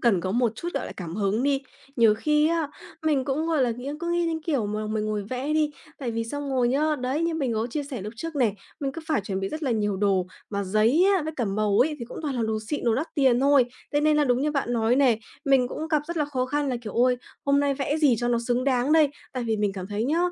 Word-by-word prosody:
cần 225 -8 +3
có 185 +2 -2
một 240 -1 +2
chút, 345 - -5
gọi - - -2
là, - - -7
cảm 170 -3 -6
hứng 210 +3 +1
đi. 280 -1 +1 0.3
Nhiều 225 -3 +5
khi 300 +6 +2
á, 330 -3 0 0.3
mình 295 -4 +1
cũng, 295 +3 -1
gọi 315 -5 +2
là, 245 - +2
nghĩ 245 +4 -5
cứ 340 0 -2
nghĩ 345 0 +1
đến 325 -1 -2
kiểu 280 - 0
mà 215 +1 -3
mình 215 0 -1
ngồi 215 -1 -1
vẽ 260 +4 -2
đi 305 -1 +2 0.3
tại 250 -4 -3
vì 230 0 -2
xong 285 +4 -4
rồi 250 -2 +2
nhá, 300 +4 +1
đấy, 260 +5 -1
như 335 0 0
mình 275 -7 -1
có 220 +2 0
chia 290 +5 -3
sẻ 270 -7 -6
lúc 210 +3 -6
trước 330 +2 -5
này, 230 -7 +2 0.3
mình 270 -1 -2
cứ 330 - -6
phải 310 -6 +1
chuẩn 195 -1 -3
bị 195 - -2
rất 310 +1 -6
là 270 - 0
nhiều 210 -3 0
đồ, 190 -2 +1 0.2
mà 200 -1 -1
giấy 220 - +3
á 355 - 0
với 315 +1 -4
cả 245 - 0
màu 205 0 +1
ấy 300 +5 +3
thì 235 - -5
cũng - - -9
toàn 290 -3 -2
là 240 - -1
đồ 220 0 0
xịn, 295 - -2
đồ 230 -2 +3
đắt 305 +8 -3
tiền 260 -5 +3
thôi, 280 -1 +5 0.3
thế 290 - +2
nên 305 0 +3
là 295 - +4
đúng 245 -1 +2
như 300 - +1
bạn 275 -4 -1
nói 230 +1 +2
này, 250 -5 +3 0.2
mình 270 -3 +3
cũng 315 +1 -5
gặp 305 -2 +2
rất 340 0 -5
là 300 - +2
khó 260 -3 -2
khăn 290 +1 -1
là, 250 - 0
kiểu: 215 -4 -6
"Ôi! 250 +1 +3 0.3
Hôm 280 0 +3
nay 280 -1 +1
vẽ 280 +2 -1
gì 290 -7 +4
cho 240 - 0
nó 240 -1 +2
xứng 245 +1 +1
đáng 265 +1 +2
đây?" 315 -2 +6 0.2
Tại 255 -2 -3
vì 225 -2 0
mình 205 -1 0
cảm 185 -1 -6
thấy 210 +2 -2
nhá, 310 +6 +1
255 Hz, 290 wpm, -25 LUFS, 220-295 Hz, 0.3 s, đây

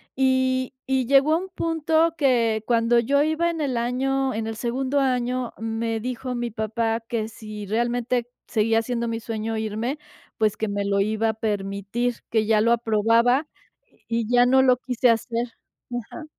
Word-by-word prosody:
y 260 0 +1
y 265 -2 +1
llegó 280 +4 +4
a - - +4
un 380 +2 -6
punto 325 -1 +1
que 230 -6 +2
cuando 235 0 +3
yo 280 +5 +2
iba 315 +2 +1
en 325 -2 -3
el 260 -4 -1
año, 265 +3 0
en 220 0 -3
el 225 - -4
segundo 260 +4 -1
año, 250 -2 0
me 225 0 -2
dijo 250 +1 -4
mi 240 -1 -3
papá 225 +1 -1
que 225 -1 -3
si 215 -2 -8
realmente 240 +2 0 0.2
seguía 225 +1 +2
siendo 235 0 -2
mi 230 0 -2
sueño 225 -1 -3
irme, 220 +6 -2 0.4
pues 215 -2 +1
que 220 - -1
me 200 0 -2
lo 200 0 +1
iba 220 +2 +1
a - - 0
permitir, 205 +3 -2
que 220 -1 +1
ya 215 -1 +3
lo 230 +1 +3
aprobaba, 230 +5 +3 0.6
y 230 -1 -1
ya 245 0 +5
no 265 +1 +5
lo 255 -2 +4
quise 250 -1 +1
hacer, 230 +1 0 0.4
ajá. 245 +6 -6
235 Hz, 170 wpm, -24 LUFS, 225-260 Hz, 0.6 s, ya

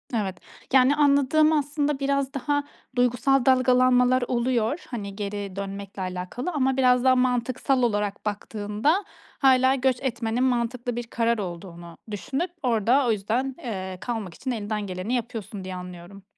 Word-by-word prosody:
Evet. 195 -5 -2 0.4
Yani 265 +2 +6
anladığım, 290 +1 +4
aslında 290 -1 0
biraz 275 -1 0
daha 290 +2 0 0.3
duygusal 245 +2 +2
dalgalanmalar 255 -1 +4
oluyor, 240 +3 0
hani, 200 -5 -5
geri 200 -2 -5
dönmekle 200 0 -6
alakalı 185 - -4
ama 265 -4 +1
biraz 250 -1 +4
daha 260 0 +5
mantıksal 255 +1 +1
olarak 205 -3 -1
baktığında 210 - -1 0.3
hâlâ 260 -1 +5
göç 260 -1 +1
etmenin 235 -1 -1
mantıklı 245 -1 -1
bir 240 - -3
karar 230 0 +1
olduğunu 170 -2 -7
düşünüp 270 - -3
orda 245 +2 +3
o - - +3
yüzden, 225 +6 -1
eee, 190 -6 -5
kalmak 225 -7 -4
için 255 +9 -4
elinden 210 -2 -3
geleni 185 +5 -4
yapıyorsun 225 -4 -4
diye 185 0 -6
anlıyorum. 180 +2 -10
240 Hz, 140 wpm, -25 LUFS, 205-265 Hz, 0.4 s, Yani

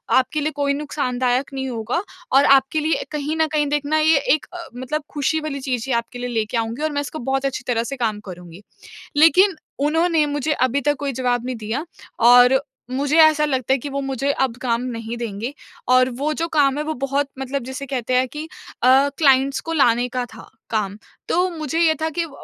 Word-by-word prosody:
आपके 280 +4 +2
लिए 305 +2 -1
कोई 280 -1 +1
नुकसानदायक 260 -3 -1
नहीं 265 -1 -3
होगा 235 +7 -2 0.3
और 275 - +5
आपके 275 +2 +4
लिए 310 +1 0
कहीं 300 +1 -3
न 320 - +2
कहीं 295 -1 +2
देखना 295 +1 0
ये 315 -1 +4 0.2
एक 310 - -7
अ, 345 -1 -7
मतलब 260 +5 -3
खुशी 300 +2 0
वाली 305 -3 -4
चीज़ 250 -4 -2
ही 260 - 0
आपके 235 +1 -3
लिए 245 0 -4
ले 225 -3 0
के 225 +3 -3
आऊँगी 230 +4 -3
और 310 - 0
मैं 285 0 -1
इसको 295 +2 -6
बहुत 270 +2 -1
अच्छी 265 -2 -2
तरह 230 -2 +1
से 275 +4 -5
काम 220 -4 -1
करुँगी। 180 -1 -10 0.6
लेकिन 350 +4 +5 0.3
उन्होंने 325 0 +2
मुझे 290 +1 -1
अभी 260 0 +1
तक 290 +2 +1
कोई 280 -1 -2
जवाब 245 -1 -1
नहीं 255 -1 -3
दिया 225 +7 -4 0.5
और 245 +2 +7 0.3
मुझे 280 +4 0
ऐसा 310 -1 +5
लगता 265 -3 0
है - - 0
कि 275 - -6
वो 280 0 -2
मुझे 270 0 -2
अब 245 -3 0
काम 235 -2 0 0.2
नहीं 230 +1 -5
देंगे 230 +2 -4 0.4
और 255 0 +4
वो 300 +2 0
जो 330 +1 -2
काम 290 -3 +2
है 300 - -2
वो 315 +1 -3
बहुत 275 +1 0
मतलब 270 0 -3
जिसे 265 +2 -6
कहते 255 -2 -2
हैं 255 +1 +2
कि 300 +4 -6 0.4
अ, 265 +3 +5
क्लाइंट्स 275 -2 +3
को 330 - -5
लाने 245 -5 +3
का 250 0 -2
था 225 - -13 0.2
काम। 205 -3 -1 0.3
तो 360 +2 +2
मुझे 320 -2 -3
ये 320 -2 +4
था 320 - 0
कि 340 +2 -2
अ - - -3
अ, 315 - -14
275 Hz, 220 wpm, -21 LUFS, 245-300 Hz, 0.6 s, और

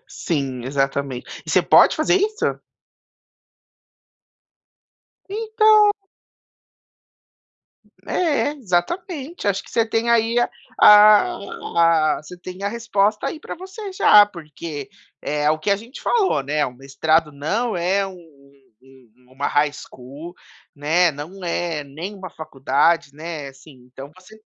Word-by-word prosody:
Sim, 135 -6 -3
exatamente. 135 -1 -3
E - - -5
você - - +3
pode - - +5
fazer - - +2
isso? 425 +3 -1 2.7
Então 430 0 +4 2.2
É, 300 -4 0
exatamente. 280 - -3
Acho 200 0 0
que - - -17
você 230 -1 +2
tem 225 +1 -1
aí 230 +1 +2
a 240 - +1 0.3
a 170 -6 +4
você 180 +4 -11
tem 185 +2 -9
a 200 - 0
resposta 210 -2 0
aí 310 - -5
pra - - -8
você 385 +3 -9
já 210 - +7
porque, 155 -5 -9 0.3
é 150 0 0
o 155 - -2
que 180 - -3
a 200 - +4
gente 230 +6 -11
falou, 400 - +1
né, 145 +2 -1
o 125 - -7
mestrado 150 +4 0
não 210 +12 -2
é 190 +3 0
um 190 - -10 0.7
um 125 -1 -23
uma 140 +2 -2
high 145 0 +1
school, 145 +4 -11 0.4
né, 160 +4 +2
não 165 +7 -9
é 170 -3 -2
nem 165 +9 -8
uma 185 -3 -9
faculdade, 140 +1 0
né, 155 -1 -7
assim, 135 +2 -16 0.2
então 135 +2 -10
você 215 +4 -17
175 Hz, 125 wpm, -21 LUFS, 145-225 Hz, 2.7 s, já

